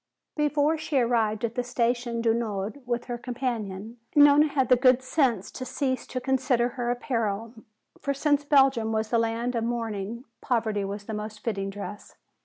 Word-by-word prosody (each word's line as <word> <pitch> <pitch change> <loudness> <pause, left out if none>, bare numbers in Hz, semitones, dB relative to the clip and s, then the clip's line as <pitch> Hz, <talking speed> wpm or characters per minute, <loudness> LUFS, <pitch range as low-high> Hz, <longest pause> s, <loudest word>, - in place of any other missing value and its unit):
Before 300 +1 +2
she 310 -2 -1
arrived 230 -3 +2
at 230 - -4
the 245 - -1
Station 240 -1 -1
du 230 -1 +3
Nord 220 +2 -3
with 240 0 -1
her 240 -1 -4
companion, 235 -4 -4 0.2
Nona 290 +1 +7
had 270 -4 0
the 250 - +7
good 255 +1 +4
sense 255 - +1
to - - -6
cease 260 -1 -2
to 255 - -3
consider 250 -2 +1
her 245 -1 -3
apparel. 230 -3 -2 0.5
For 280 - -1
since 290 +1 +1
Belgium 270 -6 +3
was 220 +1 -2
a 230 - +5
land 230 +2 -1
of 230 -2 -1
mourning, 230 0 -3 0.2
poverty 220 -5 0
was 200 +1 -5
the 220 - -6
most 210 0 -6
fitting 195 -4 -2
dress. 205 +1 -8
240 Hz, 175 wpm, -26 LUFS, 220-260 Hz, 0.5 s, Nona